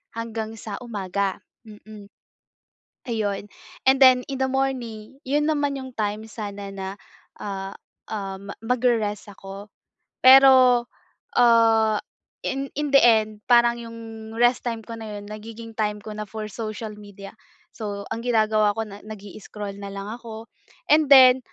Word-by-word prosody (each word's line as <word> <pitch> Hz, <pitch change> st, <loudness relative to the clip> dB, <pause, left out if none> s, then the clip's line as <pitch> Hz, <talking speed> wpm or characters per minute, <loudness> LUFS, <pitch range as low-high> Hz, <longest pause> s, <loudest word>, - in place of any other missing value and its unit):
hanggang 225 Hz, -1 st, -5 dB
sa 205 Hz, -2 st, -6 dB
umaga, 200 Hz, -4 st, -2 dB, 0.3 s
mm. 210 Hz, -1 st, -13 dB, 1.0 s
Ayun, 205 Hz, -3 st, -2 dB, 0.4 s
and 270 Hz, -, +5 dB
then 255 Hz, -2 st, +7 dB
in 270 Hz, -, -3 dB
the 265 Hz, -, +1 dB
morning, 255 Hz, -4 st, -3 dB
yun 295 Hz, +3 st, +1 dB
naman 290 Hz, -2 st, 0 dB
yung 260 Hz, -1 st, -7 dB
time 210 Hz, 0 st, -1 dB
sana 205 Hz, -2 st, -7 dB
na, 195 Hz, -1 st, -6 dB, 0.5 s
ah, 195 Hz, -1 st, -5 dB, 0.4 s
um, 200 Hz, -2 st, -5 dB
magre-rest 230 Hz, -4 st, 0 dB
ako, 195 Hz, +1 st, -10 dB, 0.5 s
pero, 260 Hz, -2 st, +8 dB, 0.5 s
ah, 225 Hz, -2 st, +5 dB, 0.5 s
in 275 Hz, +1 st, -2 dB
in 295 Hz, -1 st, -1 dB
the 275 Hz, -, +7 dB
end, 215 Hz, -2 st, +3 dB
parang 235 Hz, -1 st, +4 dB
yung 230 Hz, -1 st, -9 dB, 0.4 s
rest 240 Hz, +1 st, +3 dB
time 230 Hz, -1 st, -3 dB
ko 230 Hz, +1 st, -8 dB
na 215 Hz, -1 st, -7 dB
'yon, 205 Hz, -, -11 dB
nagiging 225 Hz, +2 st, -9 dB
time 210 Hz, -1 st, -1 dB
ko 215 Hz, -, -7 dB
na 215 Hz, 0 st, -5 dB
for 215 Hz, +1 st, -6 dB
social 215 Hz, +1 st, -5 dB
media. 200 Hz, -1 st, -11 dB, 0.4 s
So, 205 Hz, -2 st, -5 dB
ang -, -, -2 dB
ginagawa 215 Hz, -3 st, +2 dB
ko 225 Hz, -, -1 dB
na, 200 Hz, 0 st, -10 dB
nag-i-scroll 205 Hz, -1 st, -8 dB
na 200 Hz, -, -7 dB
lang 200 Hz, 0 st, -6 dB
ako. 230 Hz, -1 st, -9 dB, 0.4 s
And 305 Hz, 0 st, +5 dB
then, 260 Hz, -1 st, +9 dB
220 Hz, 140 wpm, -24 LUFS, 205-245 Hz, 1.0 s, then